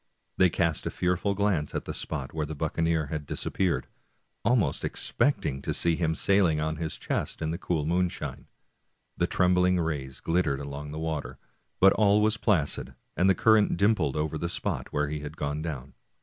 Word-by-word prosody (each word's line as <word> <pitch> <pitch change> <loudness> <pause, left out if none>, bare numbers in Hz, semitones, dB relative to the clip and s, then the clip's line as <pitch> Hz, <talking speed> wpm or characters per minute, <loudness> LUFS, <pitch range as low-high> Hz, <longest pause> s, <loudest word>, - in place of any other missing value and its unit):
They 90 - +5
cast 85 -2 0
a - - +1
fearful 90 +3 0
glance 95 -7 0
at - - -2
the - - -4
spot 70 -4 -5
where 80 -2 -2
the 80 - -5
buccaneer 80 +1 0
had 75 -2 -4
disappeared, 95 -3 -1 0.6
almost 120 -3 +2
expecting 70 - 0
to - - -2
see 85 -1 +2
him 80 -1 0
sailing 90 -4 +3
on 80 0 -1
his 80 -1 -4
chest - - -3
in 80 -1 -2
the 85 - -4
cool 80 -5 -1
moonshine. 90 +2 -2 0.7
The - - +1
trembling 90 0 +3
rays 70 -6 -3
glittered 80 -5 0
along 70 +1 -6
the 75 - -6
waters, 75 -5 -3 0.4
but 95 +1 +7
all 105 -1 +4
was 110 +1 +2
placid, 90 -12 0 0.2
and 95 +2 +3
the 95 - +5
current 110 -1 +4
dimpled 100 -8 +2
over 75 0 -1
the 85 - -2
spot - - -3
where 75 0 0
he 75 +1 -3
had 75 +2 -8
gone 75 +1 -2
down. 70 -4 -5
80 Hz, 180 wpm, -28 LUFS, 75-90 Hz, 0.7 s, but